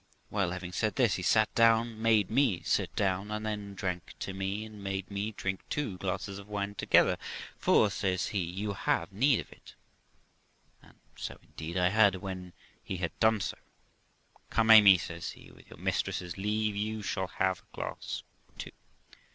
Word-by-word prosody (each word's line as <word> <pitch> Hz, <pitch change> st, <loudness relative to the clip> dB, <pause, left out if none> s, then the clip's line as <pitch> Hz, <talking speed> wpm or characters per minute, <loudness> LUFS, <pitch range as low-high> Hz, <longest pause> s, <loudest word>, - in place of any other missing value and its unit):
Well, 95 Hz, -4 st, +1 dB
having 90 Hz, 0 st, -5 dB
said 110 Hz, +3 st, -1 dB
this, 120 Hz, -6 st, +3 dB
he -, -, -2 dB
sat 110 Hz, +4 st, +3 dB
down, 115 Hz, -1 st, +3 dB
made 110 Hz, -4 st, +3 dB
me 120 Hz, -7 st, +2 dB
sit -, -, 0 dB
down, 95 Hz, +1 st, 0 dB
and 105 Hz, 0 st, -3 dB
then 105 Hz, -2 st, -4 dB
drank 90 Hz, -2 st, -4 dB
to 95 Hz, -, -3 dB
me, 95 Hz, +3 st, -3 dB
and 105 Hz, -2 st, -11 dB
made 95 Hz, 0 st, -3 dB
me 100 Hz, +2 st, -2 dB
drink 95 Hz, -2 st, -3 dB
two 120 Hz, -12 st, -2 dB
glasses 95 Hz, +1 st, -3 dB
of 100 Hz, -, -12 dB
wine 100 Hz, -1 st, -2 dB
together; -, -, +3 dB, 0.4 s
'For', 105 Hz, -, +4 dB
says 95 Hz, -3 st, -1 dB
he, 100 Hz, -, -1 dB
'you 95 Hz, +4 st, -3 dB
have 125 Hz, -1 st, -1 dB
need 130 Hz, +5 st, +3 dB
of -, -, -15 dB
it'; -, -, -15 dB, 1.1 s
and -, -, -20 dB, 0.2 s
so -, -, -6 dB
indeed 80 Hz, +3 st, -7 dB
I 90 Hz, 0 st, +3 dB
had. 100 Hz, -1 st, +5 dB
When 90 Hz, -1 st, -6 dB, 0.3 s
he 95 Hz, -, -4 dB
had 85 Hz, -2 st, -2 dB
done 110 Hz, -2 st, +4 dB
so, -, -, -4 dB, 0.9 s
'Come, 115 Hz, 0 st, +3 dB
Amy', 105 Hz, -4 st, +10 dB
says 85 Hz, -1 st, -6 dB
he, -, -, -15 dB
'with -, -, -18 dB
your -, -, -12 dB
mistress's 90 Hz, -2 st, -2 dB
leave, 105 Hz, +1 st, -1 dB
you 105 Hz, +1 st, -2 dB
shall 95 Hz, -1 st, -2 dB
have 95 Hz, -1 st, 0 dB
a -, -, -28 dB
glass -, -, -5 dB, 0.3 s
too.' -, -, -7 dB
100 Hz, 175 wpm, -30 LUFS, 95-110 Hz, 1.1 s, Amy